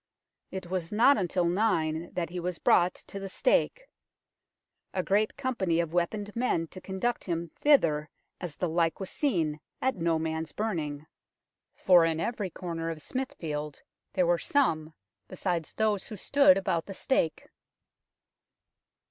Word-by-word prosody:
It 190 Hz, -1 st, -6 dB
was 180 Hz, -3 st, -2 dB
not 235 Hz, +7 st, +6 dB
until 180 Hz, -1 st, 0 dB
nine 170 Hz, -4 st, +1 dB
that 170 Hz, -2 st, -2 dB
he 180 Hz, -, -4 dB
was 175 Hz, 0 st, -3 dB
brought 180 Hz, +1 st, +3 dB
to 200 Hz, -, -8 dB
the 195 Hz, 0 st, -6 dB
stake, -, -, +1 dB, 0.6 s
" -, -, -54 dB
a 185 Hz, -, +1 dB
great 210 Hz, +3 st, +1 dB
company 230 Hz, -11 st, 0 dB
of 170 Hz, -1 st, -1 dB
weaponed 205 Hz, +4 st, -1 dB
men 230 Hz, -9 st, +1 dB
to 185 Hz, -, -10 dB
conduct 195 Hz, +6 st, -2 dB
him 170 Hz, -2 st, -2 dB
thither 160 Hz, -, +4 dB, 0.3 s
as 175 Hz, -5 st, -6 dB
the 180 Hz, -, -1 dB
like 165 Hz, 0 st, +1 dB
was 190 Hz, -, -5 dB
seen 165 Hz, -, 0 dB, 0.2 s
at 260 Hz, 0 st, +1 dB
no 165 Hz, -3 st, +1 dB
man's 160 Hz, 0 st, -3 dB
burning, 155 Hz, -9 st, -3 dB, 0.7 s
for 180 Hz, -3 st, +6 dB
in 165 Hz, -1 st, +1 dB
every 205 Hz, +2 st, -2 dB
corner 165 Hz, -1 st, -4 dB
of 165 Hz, -2 st, -5 dB
Smithfield 150 Hz, -, -4 dB, 0.3 s
there 185 Hz, -, +2 dB
were 170 Hz, 0 st, +2 dB
some, 160 Hz, -, +1 dB, 0.3 s
besides 175 Hz, -3 st, -2 dB
those 215 Hz, -3 st, 0 dB
who 215 Hz, -, -7 dB
stood 280 Hz, +6 st, +5 dB
about 185 Hz, -4 st, -1 dB
the 195 Hz, -, -7 dB
stake." 165 Hz, -, 0 dB
180 Hz, 150 wpm, -29 LUFS, 165-210 Hz, 0.7 s, not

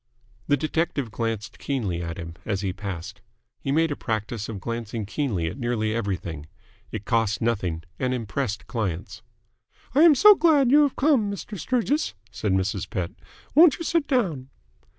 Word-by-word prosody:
The 145 Hz, -, +3 dB
detective 155 Hz, -5 st, -1 dB
glanced 115 Hz, -1 st, -3 dB
keenly 105 Hz, -11 st, -2 dB
at 85 Hz, +1 st, -5 dB
him 85 Hz, -2 st, -6 dB
as 100 Hz, -3 st, -2 dB
he 95 Hz, -2 st, -2 dB
passed. 95 Hz, -1 st, -6 dB, 0.4 s
He 135 Hz, -, -3 dB
made 160 Hz, +2 st, +2 dB
a -, -, -1 dB
practice 110 Hz, -2 st, -3 dB
of 105 Hz, -3 st, -5 dB
glancing 115 Hz, 0 st, -4 dB
keenly 110 Hz, -, -1 dB
at 80 Hz, -, -4 dB
nearly 115 Hz, -3 st, 0 dB
everything. 90 Hz, -9 st, -3 dB, 0.4 s
It 100 Hz, -, -5 dB
cost 115 Hz, -3 st, +1 dB
nothing 95 Hz, -8 st, -1 dB, 0.2 s
and 130 Hz, -1 st, 0 dB
impressed 115 Hz, -2 st, -2 dB
clients. 110 Hz, -3 st, -4 dB, 0.7 s
"I 285 Hz, -, +5 dB
am 325 Hz, -3 st, +8 dB
so 420 Hz, +9 st, +9 dB
glad 300 Hz, -8 st, +4 dB
you 295 Hz, +2 st, +7 dB
have 285 Hz, -3 st, +2 dB
come, 265 Hz, -8 st, +3 dB
Mr. 200 Hz, +1 st, -6 dB
Sturgis," 255 Hz, -, 0 dB, 0.2 s
said 105 Hz, 0 st, -2 dB
Mrs. 95 Hz, 0 st, -1 dB
Pett. 90 Hz, -6 st, -3 dB, 0.4 s
"Won't 320 Hz, 0 st, +7 dB
you -, -, -5 dB
sit 330 Hz, -3 st, +1 dB
down?" 170 Hz, -, 0 dB
115 Hz, 165 wpm, -25 LUFS, 100-165 Hz, 0.7 s, so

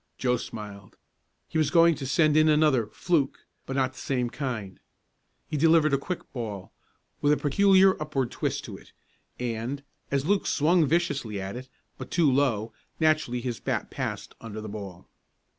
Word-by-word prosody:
Joe 125 Hz, -1 st, +1 dB
smiled. 105 Hz, -4 st, -9 dB, 0.5 s
He 160 Hz, -, -1 dB
was 155 Hz, -, +2 dB
going 170 Hz, -1 st, +5 dB
to 135 Hz, -3 st, -5 dB
send 150 Hz, +3 st, +3 dB
in 155 Hz, 0 st, +5 dB
another 150 Hz, -7 st, +3 dB
"fluke," 145 Hz, +4 st, -1 dB, 0.2 s
but 135 Hz, -, -4 dB
not 130 Hz, -1 st, +1 dB
the -, -, -12 dB
same 125 Hz, -3 st, -1 dB
kind. 120 Hz, -10 st, -4 dB, 0.7 s
He 150 Hz, -, -3 dB
delivered 160 Hz, -1 st, +4 dB
a 140 Hz, -, +3 dB
quick 175 Hz, +5 st, -6 dB
ball, 105 Hz, -6 st, -5 dB, 0.5 s
with 145 Hz, -, +3 dB
a 150 Hz, -, +4 dB
peculiar 190 Hz, +4 st, +4 dB
upward 135 Hz, -5 st, -1 dB
twist -, -, -2 dB
to -, -, -8 dB
it, -, -, -18 dB, 0.5 s
and, 125 Hz, +3 st, -3 dB, 0.3 s
as 140 Hz, 0 st, 0 dB
Luke 200 Hz, +3 st, +1 dB
swung 160 Hz, +1 st, +3 dB
viciously 145 Hz, -, 0 dB
at 95 Hz, +3 st, -5 dB
it, 130 Hz, +1 st, -8 dB, 0.3 s
but -, -, -7 dB
too 165 Hz, -5 st, +3 dB
low, 115 Hz, -5 st, +1 dB, 0.3 s
naturally 155 Hz, -6 st, +2 dB
his 120 Hz, -2 st, -4 dB
bat -, -, -3 dB
passed -, -, -4 dB
under 110 Hz, -2 st, -7 dB
the 110 Hz, -, -6 dB
ball. 100 Hz, -4 st, -8 dB
135 Hz, 170 wpm, -27 LUFS, 115-155 Hz, 0.7 s, going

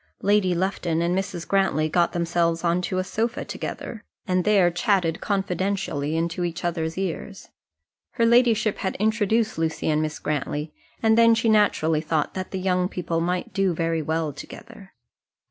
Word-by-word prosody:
Lady 200 Hz, -3 st, +3 dB
Lufton 175 Hz, -2 st, -1 dB
and 175 Hz, +1 st, +1 dB
Mrs. 190 Hz, -3 st, -3 dB
Grantly 190 Hz, -6 st, +2 dB
got 170 Hz, +2 st, +2 dB
themselves 170 Hz, -1 st, 0 dB
on 175 Hz, +1 st, +2 dB
to 185 Hz, +1 st, -2 dB
a 185 Hz, -, +1 dB
sofa 225 Hz, +5 st, -2 dB
together, 225 Hz, -3 st, -6 dB, 0.2 s
and 185 Hz, -1 st, +1 dB
there 195 Hz, -4 st, +4 dB
chatted 175 Hz, -3 st, +1 dB
confidentially 190 Hz, -6 st, -1 dB
into 170 Hz, +2 st, -1 dB
each 175 Hz, +1 st, -3 dB
other's 165 Hz, -1 st, -2 dB
ears. 190 Hz, -4 st, -5 dB, 0.6 s
Her 230 Hz, -, +2 dB
ladyship 230 Hz, -3 st, +3 dB
had 190 Hz, -, -2 dB
introduced 220 Hz, -1 st, +1 dB
Lucy 160 Hz, -1 st, -1 dB
and 155 Hz, 0 st, +1 dB
Miss 155 Hz, -1 st, -3 dB
Grantly, 150 Hz, +1 st, -3 dB, 0.3 s
and 220 Hz, +1 st, +4 dB
then 230 Hz, 0 st, +6 dB
she 225 Hz, 0 st, +1 dB
naturally 165 Hz, -7 st, +3 dB
thought 155 Hz, -1 st, -1 dB
that 185 Hz, -1 st, -5 dB
the 190 Hz, -, -4 dB
young 180 Hz, -1 st, 0 dB
people 165 Hz, -3 st, -2 dB
might 180 Hz, +1 st, -2 dB
do 195 Hz, -3 st, +1 dB
very 165 Hz, 0 st, 0 dB
well 160 Hz, 0 st, -2 dB
together. 200 Hz, +6 st, -12 dB
180 Hz, 165 wpm, -24 LUFS, 165-200 Hz, 0.6 s, then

